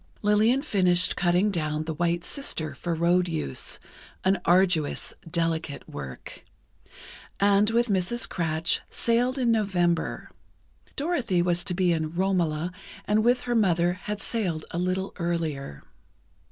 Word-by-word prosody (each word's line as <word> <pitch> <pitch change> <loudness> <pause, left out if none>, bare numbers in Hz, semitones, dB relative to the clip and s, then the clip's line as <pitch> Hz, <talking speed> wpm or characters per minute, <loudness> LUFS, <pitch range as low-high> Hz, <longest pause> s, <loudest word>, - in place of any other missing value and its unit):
Lillian 215 +6 +3
finished 180 -9 +3
cutting 180 +4 +2
down 155 -3 -2
"The 160 0 -4
White 170 +2 0
Sister," 175 - -3
for 170 -1 -3
road 175 +2 +2
use, 155 - -2 0.5
an 190 0 +3
arduous, 175 -4 +2 0.2
delicate 165 -3 -2
work, 70 -3 -9 1.0
and 200 +1 +4
with 235 +1 +2
Mrs. 200 +2 0
Kratsch, 160 -1 0
sailed 245 +3 +1
in 245 -3 +2
November. 180 -6 0 0.6
Dorothy 270 - 0
was 175 -1 +1
to 180 - -2
be 180 -1 +2
in 160 0 -3
"Romola," 175 -3 0 0.3
and 215 +1 +2
with 245 +2 +3
her 245 - -2
mother 175 -6 +3
had 205 +3 -5
sailed 180 -11 -2
a 170 - -3
little 185 +2 -1
earlier. 160 - -3
180 Hz, 130 wpm, -26 LUFS, 165-210 Hz, 1.0 s, and